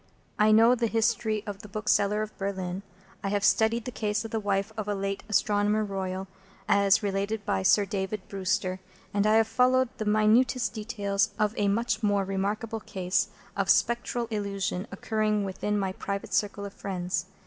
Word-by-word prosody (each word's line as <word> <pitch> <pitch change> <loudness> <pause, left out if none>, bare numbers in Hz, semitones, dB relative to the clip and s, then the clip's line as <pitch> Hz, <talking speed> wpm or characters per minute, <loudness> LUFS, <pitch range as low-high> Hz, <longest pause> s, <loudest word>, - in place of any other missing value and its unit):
I 215 0 +5
know 225 +3 +6
the 235 -2 +1
history 225 -1 0
of 205 -2 -6
the - - -10
Bookseller 210 0 +1
of 215 - -8
Berlin, 190 -2 -3 0.4
I 195 - -1
have 205 0 0
studied 220 +1 +3
the 250 - -4
case 215 -1 -2
of 225 - -7
the 225 - 0
wife 200 +1 -1
of 215 -2 -4
a 205 - 0
late 195 0 -3
Astronomer 205 +1 +2
Royal 190 -1 -4 0.4
as 200 +1 +4
related 200 +1 -2
by 200 -2 0
Sir 200 +2 +4
David 195 0 -4
Brewster, 190 -1 -1 0.3
and 205 +1 +2
I 215 - +4
have 225 0 +4
followed 255 +2 +3
the 215 - -2
minutest 215 +5 +3
details 210 -2 -1
of 210 0 +1
a 205 - +1
much 225 +2 0
more 205 -2 +2
remarkable 205 +3 -2
case 190 -1 -1 0.3
of 195 -1 -1
Spectral 235 +1 +2
Illusion 200 -2 -2
occurring 215 +1 0
within 205 +2 -2
my 195 -2 -1
private 200 +1 -5
circle 205 -1 0
of 200 - -8
friends. 180 -2 -3
205 Hz, 175 wpm, -28 LUFS, 195-220 Hz, 0.4 s, know